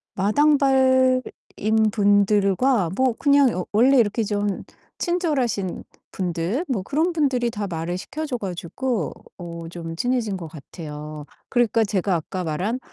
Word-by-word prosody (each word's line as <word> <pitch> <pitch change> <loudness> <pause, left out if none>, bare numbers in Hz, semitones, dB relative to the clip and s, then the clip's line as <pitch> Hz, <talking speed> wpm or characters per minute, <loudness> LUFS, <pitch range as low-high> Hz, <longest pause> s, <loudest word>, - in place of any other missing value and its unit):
마당발인 260 +2 +3 0.7
분들과 205 +1 +3
뭐 260 -1 +2
그냥 280 -3 +4
어 180 - -3
원래 255 +6 +5
이렇게 220 +1 +2
좀 205 -1 -2 0.4
친절하신 280 - -1 0.3
분들 185 - -2
뭐 235 -8 -1
그런 315 - 0
분들이 255 -7 +1
다 205 -1 -4
말을 170 +1 -3
시켜 310 +9 -5
줘 255 -5 -3
가지고 190 - -3 0.2
어 170 -2 -7
좀 165 -1 -7
친해진 240 -5 0
것 170 -3 -7
같아요. 150 -1 -9 0.2
그러니까 235 -2 +2
제가 195 -2 0
아까 180 +3 -4
말한 190 +11 -2
210 Hz, 265 characters per minute, -23 LUFS, 180-260 Hz, 0.7 s, 원래